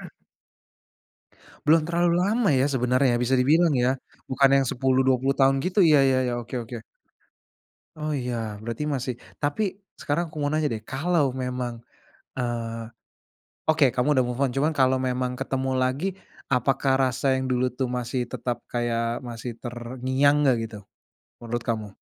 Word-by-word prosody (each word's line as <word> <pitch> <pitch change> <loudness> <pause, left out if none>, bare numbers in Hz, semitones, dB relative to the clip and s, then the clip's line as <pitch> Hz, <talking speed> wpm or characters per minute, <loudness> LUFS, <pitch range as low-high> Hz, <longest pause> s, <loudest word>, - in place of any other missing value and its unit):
Heeh. - - -9 1.6
Belum 160 +1 +5
terlalu 170 0 +2
lama 210 +5 +2
ya, 135 -1 +3
sebenarnya 130 +1 +2
ya - - +1
bisa 130 +2 +2
dibilang 160 +6 +4
ya? 130 +2 +3 0.4
Bukan 135 +1 +4
yang 135 - +2
10, 130 +1 +1
20 135 +1 +2
tahun 135 0 +4
gitu 185 +3 -1
ya 150 - +7
ya 135 -1 +3
ya, 125 - -1
oke 120 - -10
oke. 115 0 -8 1.1
Oh 155 0 -4
iya, 115 -5 -3
berarti 115 +6 -3
masih 130 -3 -2 0.2
tapi 180 +7 -1 0.2
sekarang 150 +4 0
aku - - -13
mau 145 - +1
nanya 155 +1 0
deh, 110 - -3
kalau 145 +1 +1
memang, 125 -1 -3 0.6
eee, 115 -2 -3 0.8
oke 155 -2 +4
kamu 125 +2 +1
udah 130 -2 +3
move 125 +1 -4
on 135 - +2
cuman 150 +4 +2
kalo 130 -1 +4
memang 125 0 -1
ketemu 135 0 -2
lagi, 130 +8 0 0.5
apakah 135 +2 +1
rasa 130 +1 0
yang 130 - -1
dulu 125 0 +2
tuh 130 -2 0
masih 125 +1 -3
tetap 120 -1 -2
kayak, 115 -1 -1
masih 120 +1 -6
terngiang 130 +4 0
enggak 130 -3 +4
gitu? 110 -2 -6 0.7
Menurut 120 +1 -2
kamu? 110 -4 -4
130 Hz, 160 wpm, -25 LUFS, 120-140 Hz, 1.6 s, ya